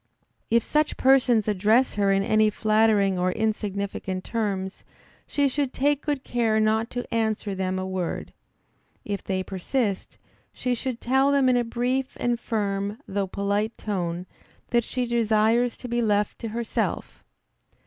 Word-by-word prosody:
If 230 -1 +3
such 300 0 0
persons 255 -5 +4
address 215 +5 +3
her 200 -1 +2
in 195 0 +2
any 215 +1 +3
flattering 215 -3 +2
or 180 +1 +1
insignificant 200 -3 -2
terms, 200 -4 -3 0.4
she 285 -1 +2
should 275 0 -1
take 290 +1 +1
good 290 -4 -2
care 225 -3 +1
not 220 +1 +2
to 245 0 -4
answer 220 -2 0
them 190 0 -2
a 185 - -2
word. 185 -2 -4 0.7
If 200 -1 -3
they 185 -1 -2
persist, 195 +2 -2 0.3
she 250 - -2
should 245 0 -4
tell 265 +3 +3
them 280 -2 +3
in 250 - +4
a 245 - +2
brief 250 +3 -2
and 240 -1 0
firm, 205 -2 -2
though 195 0 -1
polite 200 +3 -1
tone, 180 -4 -3 0.5
that 235 -1 +3
she 250 +2 -2
desires 230 0 +2
to 250 - -8
be 240 0 0
left 210 -2 +1
to 230 - -4
herself. 230 +1 -3
220 Hz, 150 wpm, -25 LUFS, 200-245 Hz, 0.7 s, persons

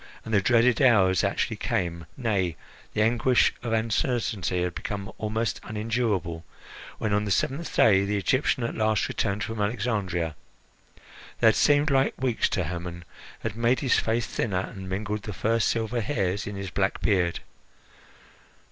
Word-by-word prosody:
And 110 - -5
the 100 - +4
dreaded 120 +2 +3
hours 95 -9 +4
actually - - -1
came 85 -2 -2
nay, 100 -9 0 0.4
the 105 - +3
anguish 120 +2 +3
of 120 - -4
uncertainty 110 -4 0
had 90 -1 -2
become 100 +2 -5
almost 110 +1 -1
unendurable, 105 -7 -2 0.5
when, 105 -2 -1
on 105 +1 +2
the - - -3
seventh 140 - -1
day, 100 -3 +5
the 105 +1 -1
Egyptian 130 +6 +1
at 115 - -2
last 110 -2 +1
returned 100 0 -1
from 115 -2 -4
Alexandria. 100 -7 -1 1.0
They - - +2
had - - +2
seemed 145 +1 +3
like 135 0 +2
weeks 125 -3 +1
to 90 - 0
Hermon, 85 +1 -6 0.4
had 115 -2 -4
made 115 +2 +2
his 135 -4 +3
face 115 +1 0
thinner, 95 -5 -2
and 95 -1 -7
mingled 105 +2 -3
the 105 - -6
first 115 +3 +1
silver 115 +1 -1
hairs 100 -6 -1
in 105 - -5
his 100 -1 -5
black 95 -1 0
beard. 90 -5 +1
105 Hz, 155 wpm, -26 LUFS, 95-115 Hz, 1.0 s, day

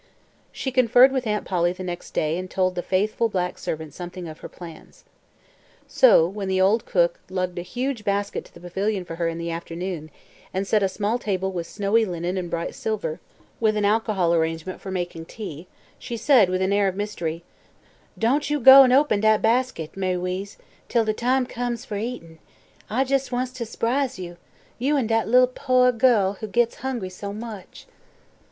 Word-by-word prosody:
She 265 - -4
conferred 255 +1 +6
with 260 -3 -2
Aunt 210 -1 -1
Polly 175 -1 +1
the 185 +1 -8
next 175 -1 -7
day 155 +1 +1
and 185 0 -6
told 185 0 0
the 180 - -3
faithful 210 +5 0
black 180 -3 -2
servant 160 -2 -5
something 175 0 -7
of 155 -1 -9
her - - -9
plans. 170 -2 -12 0.8
So, 335 - +5
when 195 +1 -5
the 190 0 0
old 200 +5 +3
cook - - +2
lugged 185 -1 -2
a - - -3
huge 245 +5 -3
basket 200 0 -1
to - - -19
the - - -12
pavilion 190 +2 -2
for 165 -1 -7
her 170 -1 0
in 165 0 -3
the 170 0 -4
afternoon, 165 -1 -5 0.5
and 190 +1 0
set 210 +1 +2
a 195 - +2
small 210 +5 -1
table 190 -4 -2
with 170 -3 -4
snowy 210 +2 +1
linen 175 -2 -3
and 180 -2 -3
bright 170 0 -3
silver, 205 -7 -3 0.4
with 215 -2 +2
an 205 - +1
alcohol 205 -5 +2
arrangement 165 +2 -1
for 195 - -7
making 175 -3 -4
tea, 175 -5 -8 0.3
she 240 -2 -5
said 235 -6 +5
with 185 +1 0
an 190 +1 +1
air 200 -1 +3
of 190 - -2
mystery: 170 -5 -4 0.7
"Don' 245 +6 +2
yo' 295 +1 0
go 265 +2 +10 0.2
open 285 -8 +1
dat 215 0 +3
bastik, 230 -8 0
Ma'y 185 -1 -1
'Weeze, 185 +3 -4 0.3
till 230 -2 +2
de 215 - +1
time 250 +3 +1
comes 245 -1 -4
fer 210 - -4
eatin'. 200 -8 -6 0.5
I 250 +5 +1
jes' 270 0 -1
wants 250 +1 -1
to 250 -3 -6
s'prise 255 +3 -1
yo' 175 -2 -8 0.4
yo' 285 +4 +1
an' 265 - +1
dat 225 0 +1
li'l' 250 +3 +6
pooah 255 -1 +2
girl 215 -5 +3
what 215 -2 -6
gits 235 +1 +1
hungry 245 -7 -4
so 200 +2 -7
much." 215 -2 -9
200 Hz, 190 wpm, -24 LUFS, 180-235 Hz, 0.8 s, go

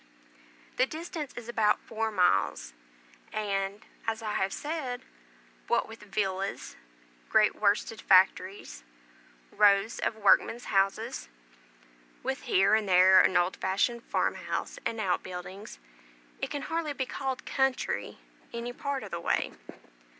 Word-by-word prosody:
The 255 - +3
distance 315 -2 -6
is 235 -1 -8
about 220 -3 +2
four 225 0 -3
miles; 180 - +1 0.6
and, 200 -1 -2 0.2
as 225 0 -2
I 210 -1 -2
have 190 0 0
said, 290 -5 -4 0.6
what - - +1
with 225 0 -11
villas, 195 -1 -3 0.5
great - - +4
worsted - - +1
factories, - - +3 0.7
rows 205 +1 +4
of - - -1
workmen's 220 +3 +3
houses, 195 - 0 0.9
with 265 +1 -2
here 195 0 +4
and 215 -2 +2
there 185 +1 +7
an 185 - +3
old 175 +1 +1
fashioned 200 +5 0
farmhouse - - -2
and 225 - -4
out 190 -4 0
buildings, 185 +3 -8 0.6
it - - -2
can 285 - -4
hardly 325 -2 -2
be 265 -1 -2
called 265 0 -4
"country" 265 -1 -1 0.3
any 235 +1 -5
part 280 0 -3
of 205 - -9
the 170 - -4
way. - - 0
215 Hz, 130 wpm, -29 LUFS, 195-250 Hz, 0.9 s, there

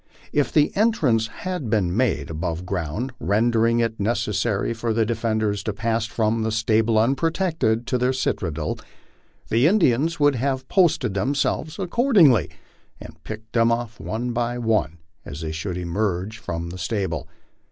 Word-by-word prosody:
If 145 -3 +1
the 150 -1 +2
entrance 150 - +2
had 180 +1 -5
been 105 -5 +2
been 90 - -3
made 80 - 0
above 85 +2 -3
ground, 95 - -3
rendering 115 +2 +2
it 115 -1 -1
necessary 105 0 0
for 115 -1 -2
the 115 -1 +2
defenders 110 -2 -1
to 105 - -1
pass 115 +2 -1
from 110 +1 0
the 110 0 -1
stable 110 0 +2
unprotected 135 - +1
to 125 +1 0
their 125 +1 +2
citadel, 80 - -2 0.7
the 120 +6 +4
Indians 165 - +2
would 145 -1 +4
have 130 +1 -2
posted 175 - +2
them 110 +9 0
selves 155 +3 -1
accordingly, 185 - +4 0.5
and 80 0 -12
picked 110 0 -8
them 115 0 +3
off 115 -2 -3
one 120 +3 -3
by 120 +1 -1
one 110 -8 0 0.3
as 70 +3 -8
they 80 -1 -3
should 85 +3 -4
emerge 95 +3 -2
from 85 0 -5
the 90 - -8
stable. 85 - -2
115 Hz, 155 wpm, -23 LUFS, 100-130 Hz, 0.7 s, the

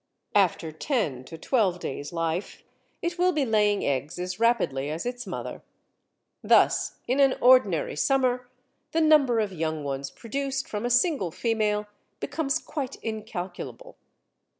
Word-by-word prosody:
After 180 -5 +2
ten 155 - -1
to 165 - -9
twelve 195 - +1
days' 145 -1 -5
life 165 +2 -3 0.4
it 345 +1 -2
will 365 +1 +4
be 300 -5 +1
laying 210 -3 +2
eggs 140 +4 -1
as 180 +2 -4
rapidly 185 - +1
as 160 +6 -4
its 245 -2 -4
mother. - - -5 0.8
Thus - - +4
in 255 +3 +1
an 270 -1 +5
ordinary 240 -10 +4
summer 250 - +1 0.4
the 325 - +2
number 290 -7 +5
of 210 -3 -1
young 160 -2 -2
ones 140 0 -3
produced 270 - -3
from 210 +2 -4
a - - 0
single 250 - +2
female 210 +2 0 0.3
becomes 285 -2 -1
quite 285 -4 -5
incalculable. 215 - -6
220 Hz, 140 wpm, -26 LUFS, 170-265 Hz, 0.8 s, an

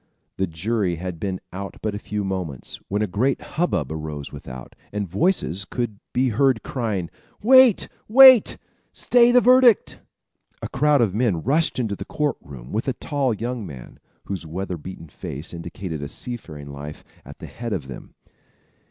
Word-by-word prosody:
The 95 - 0
jury 95 +2 -1
had 90 0 -6
been 95 0 -3
out 100 +1 -6
but 110 - -1
a 100 - -4
few 105 0 -4
moments, 90 -9 -5
when 105 +2 0
a - - 0
great 120 +9 0
hub 175 +3 -2
bub - - -2
arose 75 -2 -6
without, 65 -1 -9 0.2
and 105 -1 -3
voices 100 - 0
could 110 -1 -4
be 130 +1 +1
heard 125 +1 +2
crying: 105 -9 -3 0.3
"Wait! 260 -2 +6 0.2
wait! 260 0 +8 0.4
stay 245 -1 +4
your 250 0 +6
verdict!" 250 -3 +5 0.6
A - - -3
crowd 145 -1 +3
of 105 -6 +2
men 105 -7 0
rushed 155 +6 +1
into 110 -5 -1
the 100 - -6
court 150 +2 -1
room 65 -3 -11
with 110 +5 -2
a 130 - +1
tall 140 0 -1
young 115 +2 -3
man, 70 -9 -10 0.2
whose 95 -4 -5
weather 90 +3 -4
beaten 85 +1 -9
face 75 +2 -7
indicated 85 -1 -6
a 70 - -5
seafaring 80 -14 -7
life, 70 +2 -8 0.2
at - - -12
the - - -9
head 120 -1 -7
of 85 -10 -3
them. 65 - -10
100 Hz, 170 wpm, -23 LUFS, 85-130 Hz, 0.6 s, wait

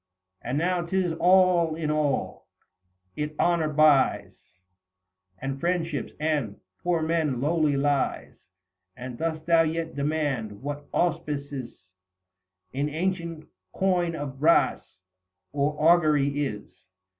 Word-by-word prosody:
And 125 +4 -3
now 175 +3 +1
'tis 180 0 0
all 180 -3 +4
in 155 -2 -2
all; 150 -3 -1 0.7
it 150 0 -4
honour 170 -3 +2
buys 150 -2 +3 1.0
And 135 +5 -4
friendships, 165 -4 -2
and, 150 -9 -1
the - - -30 0.2
poor 175 -2 0
man 160 -5 0
lowly 150 0 +1
lies: 140 -1 0 0.6
And 125 0 -7
dost 160 -1 -3
thou 165 -1 +5
yet 165 0 -2
demand, 140 -8 -2
what 145 0 -5
auspices 140 - -3 0.9
In 140 +3 -1
ancient 170 -1 -3 0.3
coin 180 -3 +1
of 140 -3 -6
brass, 160 - +2 0.5
or 145 +1 -1
augury 150 -3 +3
is 105 -4 -7
155 Hz, 110 wpm, -26 LUFS, 140-170 Hz, 1.0 s, thou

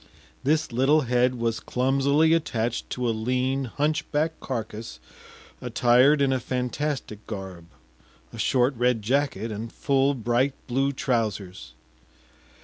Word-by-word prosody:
This 155 +2 +1
little 135 +6 +3
head 125 -1 +2
was 115 -1 -1
clumsily 140 +5 +2
attached 120 -7 -1
to 125 -1 -2
a - - +2
lean 130 +4 -1
hunch 150 +5 -1
back 155 +2 +1
carcass 110 -3 -5 0.6
attired 130 +4 +4
in 135 -1 +2
a 130 - 0
fantastic 125 -2 -3
garb, 95 -5 -7 0.7
a - - -9
short 130 +1 +2
red 125 -2 +1
jacket, 130 -1 0
and 110 +2 -5
full 140 0 +1
bright 120 +3 0
blue 135 +2 0
trousers. 105 - -2
125 Hz, 125 wpm, -25 LUFS, 115-140 Hz, 0.7 s, attired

